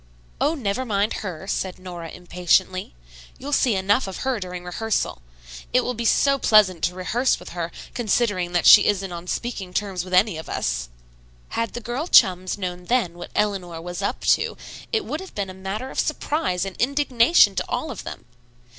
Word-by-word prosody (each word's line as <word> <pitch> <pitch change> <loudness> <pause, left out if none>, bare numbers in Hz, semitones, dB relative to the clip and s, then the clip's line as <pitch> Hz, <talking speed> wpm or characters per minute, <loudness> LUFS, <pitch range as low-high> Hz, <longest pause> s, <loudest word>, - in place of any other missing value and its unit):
"Oh, 310 - +2
never 250 -2 -2
mind 210 -3 0
her," 185 -4 -6
said 190 -2 -3
Nora 175 -3 -8
impatiently. 180 - 0 0.4
"You'll 285 +2 -5
see 245 -6 +3
enough 200 +5 +2
of 190 - -6
her 260 -4 0
during 180 -2 -6
rehearsal. 185 - -2 0.5
It - - +5
will 250 - -2
be 235 0 -4
so 275 +4 +3
pleasant 195 -8 +4
to 180 - -2
rehearse 235 +8 0
with - - -10
her, 170 -1 -4 0.2
considering 205 -6 0
that 175 - +1
she 205 - +9
isn't 195 -2 0
on 175 0 -7
speaking 195 -5 -4
terms 195 -4 -1
with 185 0 -2
any 190 -2 +4
of 160 - -9
us." - - -2 0.6
Had 230 -1 -2
the 240 - -5
girl 245 +8 -3
chums 185 - +4
known 180 -2 -5
then 235 -6 +1
what 175 0 -9
Eleanor 190 -5 -1
"was 175 +1 -6
up - - -2
to," - - +2 0.3
it 445 -3 0
would 305 - -3
have 380 +1 -10
been 195 -2 -3
a - - -10
matter 195 +7 -5
of - - -4
surprise 295 - -1
and 195 - -6
indignation 255 - +4
to - - -2
all 315 - -2
of 225 - -7
them. - - -8
195 Hz, 190 wpm, -23 LUFS, 180-240 Hz, 0.6 s, she